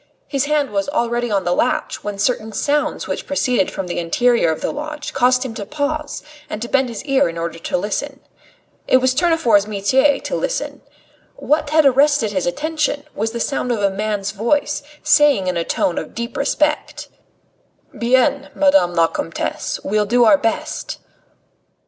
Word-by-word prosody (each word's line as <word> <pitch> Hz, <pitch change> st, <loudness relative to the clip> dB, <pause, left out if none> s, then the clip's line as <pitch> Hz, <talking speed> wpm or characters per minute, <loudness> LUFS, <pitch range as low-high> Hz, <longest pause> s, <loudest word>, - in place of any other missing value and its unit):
His 275 Hz, -1 st, 0 dB
hand 290 Hz, -3 st, 0 dB
was 200 Hz, +4 st, -1 dB
already 240 Hz, -2 st, -1 dB
on 200 Hz, -3 st, 0 dB
the 175 Hz, -, +1 dB
latch, -, -, -1 dB
when 205 Hz, -1 st, -4 dB
certain 220 Hz, +1 st, 0 dB
sounds 290 Hz, +7 st, 0 dB
which -, -, -4 dB
proceeded 250 Hz, -7 st, +1 dB
from 195 Hz, -, -5 dB
the 175 Hz, -, -3 dB
interior 235 Hz, +4 st, +2 dB
of 160 Hz, -, -3 dB
the -, -, -2 dB
lodge 300 Hz, 0 st, -6 dB
caused 250 Hz, +1 st, +2 dB
him 245 Hz, -, -5 dB
to 215 Hz, -, -5 dB
pause 295 Hz, +5 st, -3 dB, 0.3 s
and 210 Hz, -, -4 dB
to 235 Hz, -, -4 dB
bend 265 Hz, 0 st, +1 dB
his 230 Hz, +2 st, -7 dB
ear 275 Hz, -, +2 dB
in 165 Hz, -, -7 dB
order 165 Hz, 0 st, -4 dB
to -, -, -2 dB
listen. 270 Hz, +9 st, -3 dB, 0.7 s
It -, -, +5 dB
was 260 Hz, 0 st, +2 dB
Tournefort's 270 Hz, -, +3 dB
metier 260 Hz, +8 st, +2 dB
to -, -, -4 dB
listen. -, -, -3 dB, 0.5 s
What 300 Hz, 0 st, 0 dB
had 310 Hz, 0 st, +4 dB
arrested 275 Hz, -4 st, +3 dB
his 185 Hz, -3 st, -1 dB
attention 295 Hz, -, -1 dB
was 220 Hz, +2 st, -1 dB
the 235 Hz, -, -5 dB
sound 250 Hz, 0 st, -1 dB
of 220 Hz, -4 st, -1 dB
a 200 Hz, -, +3 dB
man's 205 Hz, 0 st, -2 dB
voice, 235 Hz, +9 st, 0 dB, 0.2 s
saying 295 Hz, -9 st, +4 dB
in 180 Hz, -1 st, -1 dB
a 170 Hz, -, 0 dB
tone 170 Hz, -, 0 dB
of 155 Hz, -, -9 dB
deep 235 Hz, +1 st, -5 dB
respect: 300 Hz, +2 st, -1 dB, 0.9 s
"Bien, 260 Hz, +4 st, +2 dB
Madame 285 Hz, -12 st, +3 dB
la 165 Hz, -, +5 dB
Comtesse, -, -, -3 dB
we'll 210 Hz, 0 st, 0 dB
do 240 Hz, +2 st, +4 dB
our 285 Hz, +6 st, +6 dB
best." 305 Hz, +6 st, -2 dB
250 Hz, 175 wpm, -19 LUFS, 205-290 Hz, 0.9 s, our